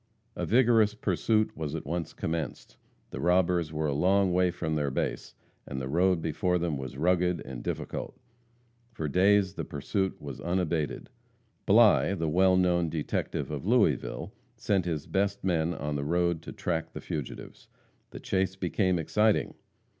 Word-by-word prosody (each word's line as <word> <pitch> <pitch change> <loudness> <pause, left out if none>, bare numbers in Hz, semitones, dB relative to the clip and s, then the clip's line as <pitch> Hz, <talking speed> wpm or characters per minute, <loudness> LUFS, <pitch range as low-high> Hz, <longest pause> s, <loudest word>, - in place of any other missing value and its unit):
A - - -3
vigorous 115 -3 +4
pursuit 110 +2 0
was 80 -1 -4
at 80 - -5
once 85 +2 -3
commenced. 80 -3 -4 0.4
The - - -6
robbers 90 -2 +2
were 80 0 -2
a 75 - 0
long 95 +5 +3
way 90 0 +3
from 85 -2 -3
their 75 -2 0
base; 65 - -3 0.3
and 65 - -4
the 65 - -4
road 85 +3 +2
before 90 +3 0
them 85 -3 -1
was 65 -1 -6
rugged 90 +2 +2
and 65 -2 -7
difficult. - - -4 0.8
For 80 -8 -3
days 95 +4 +3
the - - -4
pursuit 95 +7 -2
was 70 -3 -8
unabated. 85 -3 -2 0.6
Bligh, 100 - +5
the 80 -3 -1
well 95 +3 +4
known 90 -2 +2
detective 75 -1 -3
of 75 +4 -5
Louisville, 105 - +1 0.2
sent 95 -4 0
his 80 -4 -2
best 100 +1 -1
men 85 -3 +1
on 75 +1 -3
the 70 - -2
road 85 +1 +1
to - - -8
track 80 -2 -3
the - - -6
fugitives. 75 -5 -7 0.4
The - - -9
chase 95 0 -1
became 95 0 0
exciting. 105 +6 +1
85 Hz, 160 wpm, -28 LUFS, 75-95 Hz, 0.8 s, Bligh